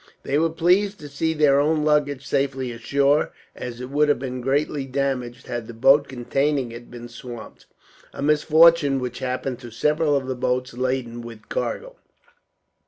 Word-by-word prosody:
They 140 +2 +1
were 165 +1 +2
pleased 180 +5 +2
to 150 - -8
see 160 +3 -1
their 145 -2 +4
own 150 +1 +2
luggage 145 -3 +1
safely 135 -2 -1
ashore; 140 +5 +1 0.2
as 120 -1 -7
it 125 +1 -7
would 150 +1 +3
have 145 - +3
been 130 -1 -5
greatly 140 +2 0
damaged, 130 -2 -2
had 120 -2 -5
the 120 - -9
boat 135 +5 +5
containing 135 +1 -1
it 120 +1 -10
been 120 0 -9
swamped; 120 -1 -10 0.4
a - - -6
misfortune 150 -1 +5
which 125 -1 -5
happened 130 0 -3
to 120 -2 -9
several 150 +5 +1
of 135 -2 0
the 130 - -2
boats 125 0 -1
laden 125 -1 -2
with 115 -2 -11
cargo. - - -3
135 Hz, 170 wpm, -23 LUFS, 125-150 Hz, 0.4 s, boat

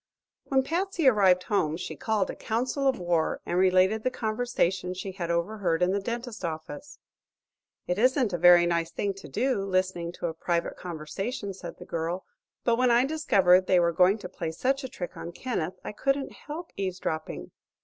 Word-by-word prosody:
When 265 -1 +2
Patsy 345 0 0
arrived 190 -6 +5
home 160 -6 0
she 180 - -6
called 215 -4 0
a - - -9
council 255 +5 -1
of 265 -2 +2
war 175 -2 0
and - - -2
related 185 +3 +4
the 255 - +1
conversation 215 -7 -1
she 190 +1 -5
had 180 -3 -5
overheard 170 0 0
in 180 - +3
the 200 - +1
dentist's 235 0 -5
office. 170 - -6 0.9
"It 180 +3 -1
isn't 255 -3 +3
a 175 - -1
very 175 0 +7
nice 170 -1 0
thing 195 +4 -2
to 195 -5 -11
do 205 - 0
listening 185 -3 -1
to - - -6
a 165 - -1
private 170 +1 -1
conversation," 195 - -5
said 180 -2 -9
the - - -10
girl, 170 +3 -3 0.4
"but 235 -1 +2
when 250 0 +3
I 240 +2 +5
discovered 195 - +4
they 185 - +5
were 170 -1 +2
going 185 +4 +4
to 205 - -7
play 170 -2 -5
such 265 - -1
a 260 - -5
trick 180 -7 -6
on 170 - -7
Kenneth 185 -7 -3
I - - -5
couldn't 275 +5 -1
help 320 +4 -8
eavesdropping." 185 -5 -4
190 Hz, 185 wpm, -27 LUFS, 175-245 Hz, 0.9 s, very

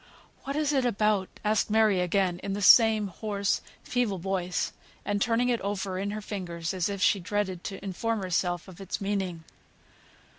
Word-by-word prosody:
"What 275 - -3
is 300 -1 +1
it 265 -2 +2
about?" 210 -4 +1 0.2
asked 215 0 +2
Mary 215 -3 +4
again, 180 0 +1
in 195 - -3
the 205 - -3
same 220 0 +7
hoarse, 200 0 -1 0.2
feeble 245 -6 0
voice, 180 0 -2 0.3
and 205 0 -1
turning 240 +2 +2
it 240 -2 +1
over 195 -2 -2
in 200 +1 -2
her 215 +1 -4
fingers, 175 -5 -4
as 185 0 0
if 200 -1 -2
she 200 - +4
dreaded 190 -1 -2
to 195 0 -6
inform 215 +3 -2
herself 175 -1 -1
of 185 0 -12
its 195 - -4
meaning. 195 -4 -2
200 Hz, 175 wpm, -28 LUFS, 185-215 Hz, 0.3 s, same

